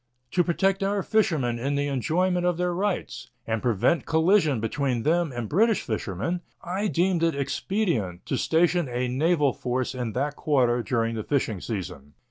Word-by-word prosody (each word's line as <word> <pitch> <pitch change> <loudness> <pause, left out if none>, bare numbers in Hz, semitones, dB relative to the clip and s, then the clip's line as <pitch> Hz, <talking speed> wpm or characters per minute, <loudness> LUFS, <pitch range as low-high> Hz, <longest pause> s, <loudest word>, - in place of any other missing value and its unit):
To 180 - +3
protect 190 +3 +1
our 195 0 0
fishermen 150 - +1
in 140 +4 -1
the 145 0 0
enjoyment 175 +7 0
of 175 -1 +1
their 180 0 0
rights 180 -8 -3 0.2
and 110 -1 -1
prevent 120 - +1
collision 160 - +3
between 120 +1 -1
them 170 0 +1
and 120 -3 -4
British 215 - +2
fishermen, 110 - -3 0.2
I 190 +4 -2
deemed 180 -1 +1
it 165 -2 +2
expedient 140 - -2
to - - -1
station 165 +1 +2
a 125 +1 -1
naval 145 +2 +2
force 125 +1 -2
in 120 -4 -4
that 145 +3 -1
quarter 125 -6 +2
during 115 -1 -1
the 110 -1 -3
fishing 110 -9 -1
season. 90 - -6
145 Hz, 165 wpm, -26 LUFS, 120-175 Hz, 0.2 s, To